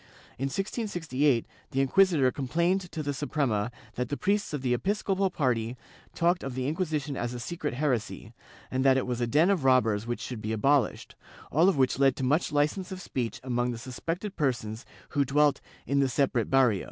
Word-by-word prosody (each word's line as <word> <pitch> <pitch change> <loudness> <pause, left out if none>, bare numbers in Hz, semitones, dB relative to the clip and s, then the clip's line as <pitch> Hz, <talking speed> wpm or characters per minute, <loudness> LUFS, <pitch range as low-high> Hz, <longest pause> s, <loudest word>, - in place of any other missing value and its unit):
In 135 - -1
1668 150 - 0 0.2
the 135 - -2
inquisitor 145 -1 +4
complained 170 +8 0
to 155 - -4
the 145 0 -2
Suprema 135 -7 -1 0.2
that 125 -1 -3
the 145 - -2
priests 205 +1 0
of 145 -3 -4
the 125 -1 +2
episcopal 195 - 0
party 125 -7 -1 0.4
talked 175 +1 +2
of 135 -2 -5
the 130 0 -2
Inquisition 155 -3 -2
as 120 -1 -3
a - - -5
secret 150 +1 -4
heresy, 120 -5 -2 0.4
and 130 0 0
that 135 -1 +5
it 130 - 0
was 125 -1 -3
a 120 - +1
den 155 +10 +4
of 180 -8 0
robbers 115 -5 +3
which 120 - -2
should 120 -4 -5
be 110 +1 -2
abolished, 135 +5 +1 0.4
all 165 +7 +5
of 190 - 0
which 130 0 +2
led 135 -2 +4
to - - -4
much 145 +7 +1
licence 150 +6 0
of 185 - -5
speech 120 -9 -3
among 120 -1 0
the 120 - -3
suspected 165 - -5
persons 120 -6 -2 0.2
who 145 -2 +1
dwelt 145 +2 +2 0.2
"in 140 0 +1
the 135 -1 +3
separate 125 -4 +1
barrio." 130 -7 +4
135 Hz, 190 wpm, -28 LUFS, 125-160 Hz, 0.4 s, that